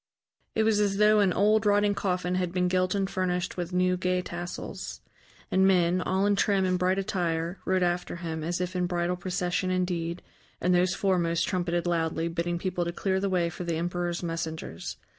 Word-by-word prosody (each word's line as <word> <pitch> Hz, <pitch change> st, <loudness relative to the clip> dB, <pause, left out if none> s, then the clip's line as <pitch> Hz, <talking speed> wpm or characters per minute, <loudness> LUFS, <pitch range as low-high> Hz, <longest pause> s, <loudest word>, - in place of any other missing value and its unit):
It 220 Hz, -, +3 dB
was 220 Hz, -1 st, +3 dB
as 200 Hz, -1 st, +1 dB
though 210 Hz, +1 st, +5 dB
an 200 Hz, -3 st, +4 dB
old, 210 Hz, +3 st, +3 dB
rotting 205 Hz, 0 st, +3 dB
coffin 180 Hz, -2 st, -1 dB
had 180 Hz, -1 st, 0 dB
been 180 Hz, 0 st, +1 dB
gilt 185 Hz, +1 st, +1 dB
and 195 Hz, -1 st, +1 dB
furnished 180 Hz, -1 st, -1 dB
with 175 Hz, -1 st, -4 dB
new, 180 Hz, 0 st, +2 dB
gay 180 Hz, 0 st, 0 dB
tassels. 175 Hz, 0 st, -6 dB, 0.5 s
And 190 Hz, 0 st, +4 dB
men, 180 Hz, -1 st, +3 dB
all 190 Hz, +2 st, +1 dB
in 205 Hz, 0 st, +3 dB
trim 195 Hz, -1 st, +2 dB
and 185 Hz, -1 st, +1 dB
bright 185 Hz, +1 st, +2 dB
attire, 175 Hz, -2 st, -1 dB
rode 185 Hz, -1 st, +2 dB
after 175 Hz, 0 st, -1 dB
him, 165 Hz, -2 st, -4 dB
as 175 Hz, +2 st, -2 dB
if 180 Hz, 0 st, -3 dB
in 180 Hz, -1 st, +1 dB
bridal 175 Hz, 0 st, 0 dB
procession 180 Hz, 0 st, -1 dB
indeed, 180 Hz, -2 st, -1 dB, 0.4 s
and 180 Hz, -, +2 dB
those 180 Hz, +1 st, +3 dB
foremost 170 Hz, -4 st, +1 dB
trumpeted 175 Hz, -2 st, -1 dB
loudly, 165 Hz, -1 st, 0 dB
bidding 170 Hz, +1 st, -2 dB
people 180 Hz, 0 st, -2 dB
to 170 Hz, -, -2 dB
clear 190 Hz, +2 st, 0 dB
the 200 Hz, 0 st, 0 dB
way 180 Hz, -2 st, +1 dB
for 175 Hz, -, -6 dB
the 170 Hz, -1 st, -1 dB
emperor's 175 Hz, +1 st, -2 dB
messengers. 160 Hz, -, -4 dB
180 Hz, 195 wpm, -28 LUFS, 175-190 Hz, 0.5 s, though